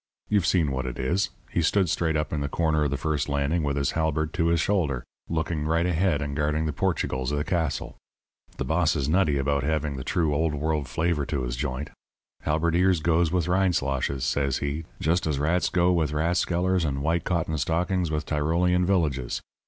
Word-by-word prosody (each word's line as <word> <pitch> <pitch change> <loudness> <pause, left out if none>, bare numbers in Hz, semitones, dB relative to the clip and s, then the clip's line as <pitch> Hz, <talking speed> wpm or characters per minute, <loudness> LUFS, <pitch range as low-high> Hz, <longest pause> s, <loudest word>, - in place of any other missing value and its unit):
You've 100 -4 +2
seen 80 -7 +2
what 65 -1 -2
it 60 - -5
is 90 +10 0 0.2
he 85 - +1
stood 95 +4 +2
straight 80 0 0
up 75 +1 -2
in 75 - -1
the 70 - -2
corner 80 -1 +1
of - - +1
the 70 - -2
first 75 +1 -1
landing 70 +4 0
with 70 -1 -1
his 70 -1 +1
halberd 80 -1 -1
to 85 -3 +1
his 85 0 +2
shoulder, 80 -9 0 0.3
looking 80 -2 -1
right 85 +2 +2
ahead 90 -3 +1
and 70 0 -4
guarding 75 +1 0
the 75 - -2
Portugals 70 -7 -1
of 75 - 0
the 75 - 0
castle. 80 -3 -2 0.6
The - - -2
boss 80 0 +2
is 70 -3 -1
nutty 80 -3 +2
about 70 0 +1
having 75 -1 -1
the 65 - -5
true 80 +2 0
Old 80 +1 +1
World 75 -1 -1
flavour 75 +3 0
to 70 -4 -2
his - - -3
joint. 65 +2 -4 0.5
'Halberdiers 85 +3 +2
goes 80 +1 +2
with 90 -2 +1
Rindsloshes,' 70 -8 0
says 70 -1 0
he, 75 +3 -3
'just 85 +2 +1
as 75 -3 0
rats 80 +5 +1
goes 90 0 +3
with 80 -3 0
rathskellers 90 +3 +1
and 70 -2 -2
white 80 +1 +1
cotton 85 -3 -1
stockings 85 +4 0
with 75 -1 -2
Tyrolean 85 +4 +1
villages.' 75 -10 0
80 Hz, 200 wpm, -26 LUFS, 70-85 Hz, 0.6 s, goes